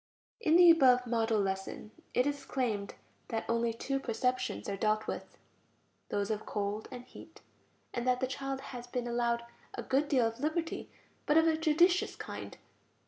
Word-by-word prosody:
In 330 Hz, -8 st, +3 dB
the 350 Hz, -1 st, +9 dB
above 255 Hz, -6 st, +5 dB
"model" 225 Hz, -2 st, +1 dB
lesson, 195 Hz, +2 st, -3 dB, 0.2 s
it 250 Hz, -, +4 dB
is 285 Hz, -1 st, -2 dB
claimed 225 Hz, -7 st, -2 dB, 0.3 s
that 225 Hz, -1 st, -3 dB
only 230 Hz, 0 st, +1 dB
two 270 Hz, +4 st, -2 dB
perceptions 255 Hz, +1 st, -1 dB
are 200 Hz, -, -2 dB
dealt 215 Hz, +2 st, +1 dB
with, -, -, -6 dB, 0.7 s
those 205 Hz, +1 st, -1 dB
of 215 Hz, 0 st, -2 dB
cold 205 Hz, +1 st, -3 dB
and 250 Hz, -2 st, -8 dB
heat, -, -, -14 dB, 0.5 s
and 240 Hz, +1 st, -2 dB
that 250 Hz, 0 st, +3 dB
the 260 Hz, -, +1 dB
child 270 Hz, +1 st, -4 dB
has 245 Hz, -1 st, -7 dB
been 245 Hz, -1 st, -3 dB
allowed 235 Hz, 0 st, 0 dB, 0.3 s
a -, -, -4 dB
good 275 Hz, +3 st, +1 dB
deal 260 Hz, -6 st, +3 dB
of 225 Hz, +1 st, -2 dB
liberty, 315 Hz, +3 st, -2 dB, 0.4 s
but 295 Hz, -, +4 dB
of 320 Hz, -, +6 dB
a 320 Hz, -, +4 dB
judicious 335 Hz, +3 st, +3 dB
kind. -, -, -7 dB
250 Hz, 170 wpm, -32 LUFS, 225-275 Hz, 0.7 s, the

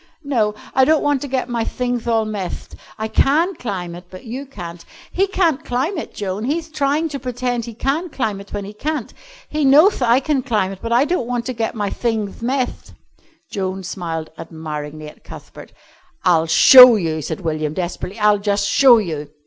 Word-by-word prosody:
"No, 225 Hz, -7 st, 0 dB, 0.2 s
I 265 Hz, -, +4 dB
don't 310 Hz, +3 st, +3 dB
want 290 Hz, -2 st, +1 dB
to 285 Hz, -, -4 dB
get 260 Hz, -2 st, -2 dB
my 235 Hz, -2 st, -1 dB
thingth 245 Hz, 0 st, -3 dB
all 225 Hz, -2 st, +2 dB
methed. 205 Hz, -4 st, -5 dB, 0.2 s
I 220 Hz, 0 st, -3 dB
can 310 Hz, -, +2 dB
climb 190 Hz, -, -5 dB
it, 175 Hz, +1 st, -10 dB
but 185 Hz, 0 st, -11 dB
you 260 Hz, +5 st, -6 dB
can't. 175 Hz, -9 st, -9 dB, 0.3 s
He 390 Hz, +2 st, +1 dB
can't 335 Hz, -6 st, +1 dB
climb 260 Hz, +10 st, -1 dB
it, -, -, -7 dB
Joan, 200 Hz, +2 st, -4 dB
he'th 315 Hz, +3 st, -3 dB
trying 295 Hz, +2 st, 0 dB
to 280 Hz, -2 st, -5 dB
pretend 245 Hz, -2 st, -3 dB
he 235 Hz, -, -9 dB
can 290 Hz, +9 st, -1 dB
climb 215 Hz, -9 st, -3 dB
it 200 Hz, -, -15 dB
when 205 Hz, -1 st, -4 dB
he 205 Hz, -, -9 dB
can't. 290 Hz, +3 st, -4 dB, 0.3 s
He 305 Hz, 0 st, -2 dB
knowth 295 Hz, +7 st, +5 dB
I 240 Hz, +1 st, +4 dB
can 275 Hz, -1 st, 0 dB
climb 215 Hz, -7 st, -1 dB
it, 195 Hz, -, -9 dB
but 230 Hz, -, -5 dB
I 245 Hz, +4 st, +4 dB
don't 340 Hz, -7 st, -1 dB
want 245 Hz, -1 st, -2 dB
to 255 Hz, -, -3 dB
get 225 Hz, -1 st, -3 dB
my 205 Hz, -2 st, -2 dB
thingth 220 Hz, -4 st, -2 dB
methed." 255 Hz, +2 st, -3 dB, 0.6 s
Joan 190 Hz, -1 st, -3 dB
smiled 165 Hz, -3 st, -5 dB
admiringly 155 Hz, -2 st, -7 dB
at 150 Hz, -, -14 dB
Cuthbert. -, -, -12 dB, 0.5 s
"I'll 165 Hz, -3 st, +3 dB
show 250 Hz, +9 st, +9 dB
you," 160 Hz, -6 st, -2 dB
said 175 Hz, -, -5 dB
William 155 Hz, -2 st, -2 dB
desperately. 185 Hz, +3 st, -4 dB
"I'll 210 Hz, -1 st, +3 dB
just 200 Hz, 0 st, 0 dB
show 255 Hz, -1 st, +6 dB
you." 155 Hz, -8 st, -3 dB
230 Hz, 195 wpm, -19 LUFS, 190-270 Hz, 0.6 s, show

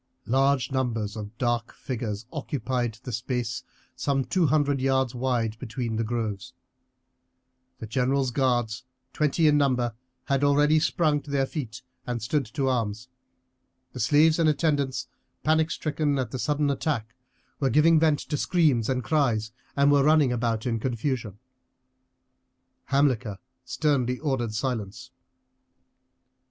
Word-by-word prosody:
Large 135 Hz, +2 st, +2 dB
numbers 115 Hz, -5 st, -1 dB
of 105 Hz, +1 st, -7 dB
dark 120 Hz, -1 st, -1 dB
figures 115 Hz, -5 st, -4 dB
occupied 125 Hz, -5 st, -2 dB
the 125 Hz, -, -6 dB
space 120 Hz, 0 st, -2 dB, 0.3 s
some 135 Hz, -2 st, 0 dB
two 170 Hz, +6 st, +2 dB
hundred 145 Hz, -1 st, +2 dB
yards 130 Hz, -2 st, +1 dB
wide 120 Hz, -3 st, -1 dB
between 120 Hz, -1 st, -4 dB
the 115 Hz, -, 0 dB
groves. 110 Hz, -3 st, -3 dB, 1.2 s
The -, -, -7 dB
general's 130 Hz, +3 st, 0 dB
guards, 120 Hz, -2 st, 0 dB, 0.3 s
twenty 150 Hz, +2 st, +1 dB
in 150 Hz, -1 st, +4 dB
number, 125 Hz, -4 st, +1 dB, 0.3 s
had 140 Hz, 0 st, 0 dB
already 145 Hz, +2 st, +4 dB
sprung 155 Hz, -1 st, +1 dB
to 145 Hz, -, -14 dB
their 140 Hz, -1 st, +1 dB
feet 125 Hz, -5 st, -6 dB, 0.2 s
and 120 Hz, -1 st, -2 dB
stood 135 Hz, +6 st, -1 dB
to 140 Hz, -3 st, -2 dB
arms; 115 Hz, -2 st, -1 dB, 0.8 s
the 125 Hz, -, -7 dB
slaves 150 Hz, +7 st, +4 dB
and 160 Hz, -2 st, +4 dB
attendants, 145 Hz, -4 st, 0 dB, 0.4 s
panic 160 Hz, +1 st, +3 dB
stricken 150 Hz, -2 st, -1 dB
at 125 Hz, -4 st, -2 dB
the 130 Hz, -, -4 dB
sudden 145 Hz, +1 st, +1 dB
attack, 125 Hz, -6 st, -2 dB, 0.5 s
were 135 Hz, -, +2 dB
giving 155 Hz, +5 st, +5 dB
vent 155 Hz, -2 st, +3 dB
to 150 Hz, -, -3 dB
screams 145 Hz, -10 st, +2 dB
and 130 Hz, -1 st, 0 dB
cries 120 Hz, -8 st, +1 dB, 0.2 s
and 140 Hz, 0 st, +4 dB
were 140 Hz, -1 st, +5 dB
running 150 Hz, -3 st, +4 dB
about 115 Hz, -2 st, -1 dB
in 115 Hz, -2 st, 0 dB
confusion. 120 Hz, -3 st, -2 dB, 1.5 s
Hamilcar 130 Hz, -7 st, +1 dB, 0.3 s
sternly 130 Hz, -5 st, 0 dB
ordered 125 Hz, -7 st, -2 dB
silence. 125 Hz, 0 st, -3 dB
130 Hz, 135 wpm, -26 LUFS, 115-145 Hz, 1.5 s, giving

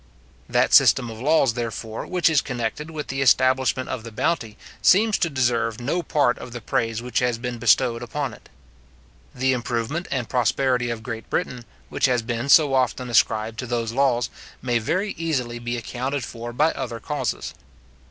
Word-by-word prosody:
That -, -, +2 dB
system 120 Hz, -3 st, +5 dB
of 110 Hz, +1 st, -9 dB
laws, 140 Hz, -3 st, +3 dB
therefore, 115 Hz, -1 st, -5 dB
which 180 Hz, -1 st, +1 dB
is 155 Hz, -5 st, +4 dB
connected 125 Hz, +4 st, -4 dB
with 155 Hz, -2 st, -6 dB
the 135 Hz, 0 st, -2 dB
establishment 130 Hz, 0 st, +3 dB
of 125 Hz, -4 st, -4 dB
the 115 Hz, -, -8 dB
bounty, 115 Hz, -3 st, -1 dB, 0.2 s
seems 215 Hz, +3 st, +5 dB
to 170 Hz, -, +1 dB
deserve 120 Hz, -5 st, 0 dB
no 145 Hz, +9 st, -1 dB
part 145 Hz, -7 st, +1 dB
of 125 Hz, -, -9 dB
the 120 Hz, -, -5 dB
praise 115 Hz, 0 st, -2 dB
which 125 Hz, -2 st, -1 dB
has 125 Hz, -2 st, 0 dB
been 120 Hz, 0 st, -5 dB
bestowed 120 Hz, 0 st, +3 dB
upon 135 Hz, +3 st, -3 dB
it. -, -, -16 dB, 0.9 s
The 130 Hz, +1 st, +1 dB
improvement 125 Hz, +7 st, -2 dB
and 130 Hz, -4 st, -2 dB
prosperity 125 Hz, 0 st, +1 dB
of 115 Hz, -2 st, -4 dB
Great 115 Hz, -2 st, -6 dB
Britain, 125 Hz, -2 st, -2 dB, 0.2 s
which -, -, +1 dB
has 125 Hz, -3 st, +1 dB
been 120 Hz, +3 st, -3 dB
so 145 Hz, -1 st, +6 dB
often 125 Hz, -1 st, 0 dB
ascribed 110 Hz, -1 st, +2 dB
to 125 Hz, -, -4 dB
those 115 Hz, -2 st, -2 dB
laws, 125 Hz, -2 st, +1 dB, 0.3 s
may 120 Hz, -2 st, 0 dB
very 185 Hz, -, -1 dB
easily 125 Hz, -8 st, -2 dB
be 120 Hz, +1 st, -3 dB
accounted 125 Hz, +3 st, -3 dB
for 120 Hz, 0 st, -7 dB
by 150 Hz, +7 st, +2 dB
other 120 Hz, -3 st, -5 dB
causes. 140 Hz, -6 st, -3 dB
125 Hz, 175 wpm, -23 LUFS, 115-135 Hz, 0.9 s, so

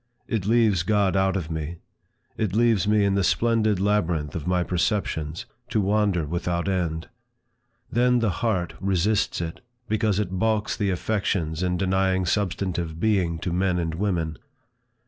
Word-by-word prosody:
It 105 Hz, -5 st, -2 dB
leaves 110 Hz, -5 st, +3 dB
God 100 Hz, 0 st, +2 dB
out 95 Hz, 0 st, +2 dB
of 85 Hz, -3 st, -5 dB
me. 80 Hz, +1 st, -4 dB, 0.6 s
It 105 Hz, -3 st, -1 dB
leaves 115 Hz, -3 st, +3 dB
me 105 Hz, -1 st, +3 dB
in 100 Hz, -, +2 dB
the 100 Hz, 0 st, +2 dB
splendid 110 Hz, -2 st, +2 dB
labyrinth 90 Hz, -7 st, 0 dB
of 80 Hz, -1 st, -4 dB
my 90 Hz, -1 st, +2 dB
perceptions, 85 Hz, -4 st, -1 dB, 0.2 s
to -, -, +1 dB
wander 100 Hz, -4 st, +1 dB
without 85 Hz, +3 st, -2 dB
end. 85 Hz, -4 st, -1 dB, 0.8 s
Then 125 Hz, +1 st, +3 dB
the 115 Hz, -4 st, +1 dB
heart 95 Hz, -8 st, 0 dB
resists 95 Hz, +1 st, +1 dB
it, 80 Hz, -1 st, -5 dB, 0.3 s
because 105 Hz, -2 st, +1 dB
it 105 Hz, -4 st, -1 dB
balks 110 Hz, 0 st, +1 dB
the 100 Hz, -2 st, 0 dB
affections 90 Hz, -4 st, -1 dB
in 90 Hz, -1 st, 0 dB
denying 95 Hz, 0 st, +1 dB
substantive 90 Hz, -4 st, -1 dB
being 95 Hz, -5 st, +1 dB
to 90 Hz, -, -2 dB
men 90 Hz, 0 st, +1 dB
and 85 Hz, -2 st, -1 dB
women. 85 Hz, -4 st, -1 dB
95 Hz, 150 wpm, -25 LUFS, 85-105 Hz, 0.8 s, leaves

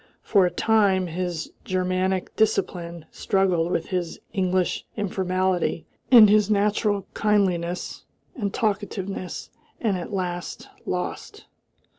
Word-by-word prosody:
For 195 Hz, -4 st, +4 dB
a -, -, 0 dB
time 195 Hz, 0 st, +2 dB
his 175 Hz, -1 st, -4 dB
Germanic 185 Hz, 0 st, -1 dB
discipline 170 Hz, -6 st, 0 dB
struggled 180 Hz, -3 st, +1 dB
with 165 Hz, -, -1 dB
his 180 Hz, -3 st, -2 dB, 0.2 s
English 185 Hz, -2 st, 0 dB
informality 185 Hz, -4 st, 0 dB, 0.2 s
and 235 Hz, -4 st, +9 dB
his 210 Hz, 0 st, +4 dB
natural 205 Hz, -1 st, +1 dB
kindliness 180 Hz, -5 st, 0 dB, 0.3 s
and 205 Hz, -6 st, -2 dB
talkativeness, 200 Hz, -3 st, -3 dB, 0.3 s
and 210 Hz, -5 st, 0 dB
at 175 Hz, -, -6 dB
last 180 Hz, -3 st, -4 dB, 0.2 s
lost. -, -, -4 dB
185 Hz, 105 wpm, -24 LUFS, 180-205 Hz, 0.3 s, and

